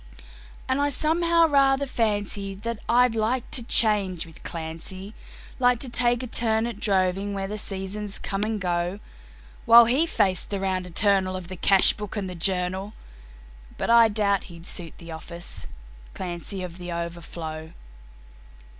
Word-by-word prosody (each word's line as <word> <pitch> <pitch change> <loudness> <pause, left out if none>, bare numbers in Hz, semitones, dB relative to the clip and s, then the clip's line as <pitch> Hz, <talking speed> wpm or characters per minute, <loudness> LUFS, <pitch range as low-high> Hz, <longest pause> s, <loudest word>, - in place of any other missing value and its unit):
And 260 +2 +1
I 285 - +2
somehow 335 +3 +3
rather 275 -1 +3
fancy 205 -5 -1
that 230 +3 -5
I'd 245 0 +4
like 225 +3 -1
to 285 -5 +1
change 205 -7 +2
with 165 -2 -15
Clancy, 170 +5 -7 0.5
Like 250 -1 +4
to 255 - 0
take 240 0 +1
a - - -3
turn 225 -2 0
at 235 - -5
droving 195 0 0
where 195 0 -3
the 210 +2 -5
seasons 195 +1 -4
come 195 0 -3
and 215 0 -2
go, 175 +1 -1 0.7
While 235 +1 +9
he 270 +8 +2
faced 190 - +1
the 200 - -2
round 185 -1 -1
eternal 190 +1 +1
of 185 -1 -7
the 185 - -6
cash 190 +2 +5
book 210 0 -7
and 200 -2 -2
the 180 - -6
journal 185 +3 -2 0.8
But - - 0
I 235 -1 +7
doubt 205 -2 +1
he'd 170 -1 -12
suit 170 -4 -6
the 170 -1 -10
office, 160 - -7 0.5
Clancy, 185 +1 -5
of 180 0 -8
The 175 0 -6
Overflow. 170 -2 -6
200 Hz, 155 wpm, -25 LUFS, 180-230 Hz, 0.8 s, While